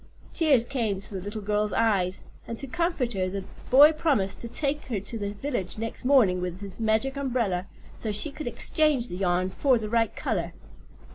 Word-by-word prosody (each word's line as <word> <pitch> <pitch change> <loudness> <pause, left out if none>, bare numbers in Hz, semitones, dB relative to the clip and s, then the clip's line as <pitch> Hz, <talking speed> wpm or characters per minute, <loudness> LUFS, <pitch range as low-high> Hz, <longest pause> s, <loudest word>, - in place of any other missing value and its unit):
Tears 285 -9 +3
came 230 -7 -1
to 200 - -8
the 190 - -4
little 205 +2 -5
girl's 210 0 0
eyes, 195 -5 +1 0.2
and 230 - -5
to 275 - -1
comfort 285 -4 -1
her 185 -2 -1
the 195 0 -4 0.3
boy 285 +4 +8
promised 280 - 0
to 235 - -5
take 285 +4 -1
her 230 -6 -2
to 205 +4 -6
the 205 0 -3
village 215 -5 -3
next 225 +3 -5
morning 225 -10 +4
with 180 +1 -4
his 195 -1 -7
magic 225 +4 +1
umbrella, 235 -10 -1 0.3
so 220 - -3
she 210 +9 0
could 300 -1 -7
exchange 260 +2 +1
the 180 - -5
yarn 185 0 +1
for 265 +2 +3
the 215 -2 -4
right 230 0 +1
color. - - -2
225 Hz, 195 wpm, -27 LUFS, 195-270 Hz, 0.3 s, boy